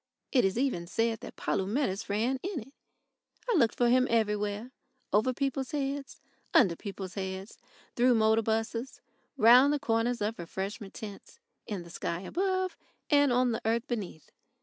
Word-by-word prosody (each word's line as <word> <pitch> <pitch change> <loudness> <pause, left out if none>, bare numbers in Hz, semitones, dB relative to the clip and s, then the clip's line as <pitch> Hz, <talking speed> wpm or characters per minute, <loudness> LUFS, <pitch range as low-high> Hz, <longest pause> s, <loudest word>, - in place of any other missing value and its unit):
It 255 - +4
is 195 +2 +1
even 245 -10 0
said 225 +4 0
that - - -10
Polumetis 205 +1 -1
ran 235 +6 0
in 370 -7 -3
it. 270 +6 -15 0.7
I 475 - +2
looked 235 - +3
for 240 - +3
him 255 +1 +4
everywhere 210 +1 0 0.4
over 215 +5 +3
people's 270 +2 -2
heads, 280 -1 -3 0.4
under 185 -8 +6
people's 195 -1 -7
heads, 190 +1 -5 0.4
through 245 0 +4
motor 220 0 +4
buses, 225 +3 -2 0.4
round 250 +4 +7
the 295 - +1
corners 235 -2 0
of 210 +1 -2
refreshment 195 +4 -5
tents, 215 - -9 0.3
in 200 -5 -4
the 170 - -13
sky 170 0 -3
above, 370 - -1 0.4
and 285 -2 +5
on 250 0 +3
the 225 - -2
earth 230 +4 0
beneath. 205 - -5
230 Hz, 155 wpm, -30 LUFS, 205-260 Hz, 0.7 s, round